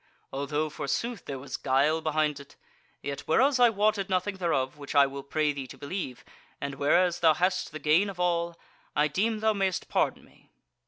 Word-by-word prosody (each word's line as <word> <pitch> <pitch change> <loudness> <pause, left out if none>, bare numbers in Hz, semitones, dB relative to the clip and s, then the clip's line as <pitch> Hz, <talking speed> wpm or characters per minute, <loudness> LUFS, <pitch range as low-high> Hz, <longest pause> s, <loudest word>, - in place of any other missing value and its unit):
Although, 145 +3 -1
forsooth, 200 - -3
there 140 - -5
was 130 0 -6
guile 145 +5 +2
behind 155 -2 0
it. 140 - -14 0.5
Yet 140 0 -4
whereas 260 - +3
I 245 -1 +7
wotted 205 -2 +1
nothing 190 +1 0
thereof, 135 -8 0
which 145 0 -8
I 140 -1 +7
will 140 0 -5
pray 150 +2 0
thee 135 -2 -6
to - - -11
believe, 140 -5 -5 0.3
and 140 0 -4
whereas 175 +6 +2
thou 160 -3 +5
hast 185 +1 0
the 155 - -6
gain 155 +7 +3
of 190 -2 -9
all, 170 -1 0 0.4
I 150 +1 +3
deem 215 +8 0
thou 220 0 +3
mayst 195 -3 -1
pardon - - 0
me." - - -25
155 Hz, 190 wpm, -28 LUFS, 140-190 Hz, 0.5 s, I